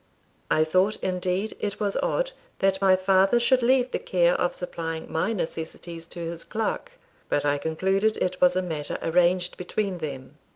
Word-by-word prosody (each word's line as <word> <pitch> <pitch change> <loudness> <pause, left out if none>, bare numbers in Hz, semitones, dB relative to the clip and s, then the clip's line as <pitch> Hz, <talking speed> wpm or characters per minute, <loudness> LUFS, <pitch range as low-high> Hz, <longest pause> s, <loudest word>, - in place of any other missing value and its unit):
I 155 - +4
thought, 185 +6 +2
indeed, 185 +3 -1
it 205 -1 -3
was 205 -2 -1
odd - - 0 0.3
that 190 0 +1
my 190 -1 +6
father 190 +4 +3
should 250 +2 +3
leave 255 +1 +3
the - - -1
care 175 -1 +2
of 175 - 0
supplying 165 -2 -5
my 160 +7 0
necessities 165 -3 -5
to 175 - -10
his 165 0 -4
clerk; 225 - -3 0.4
but 145 - +1
I 145 0 +2
concluded 190 +7 +1
it 185 0 -2
was 180 0 +5
a 185 - +1
matter 155 -4 -3
arranged 180 +1 +2
between 185 0 -2
them. 140 -1 -7
180 Hz, 170 wpm, -26 LUFS, 165-200 Hz, 0.4 s, my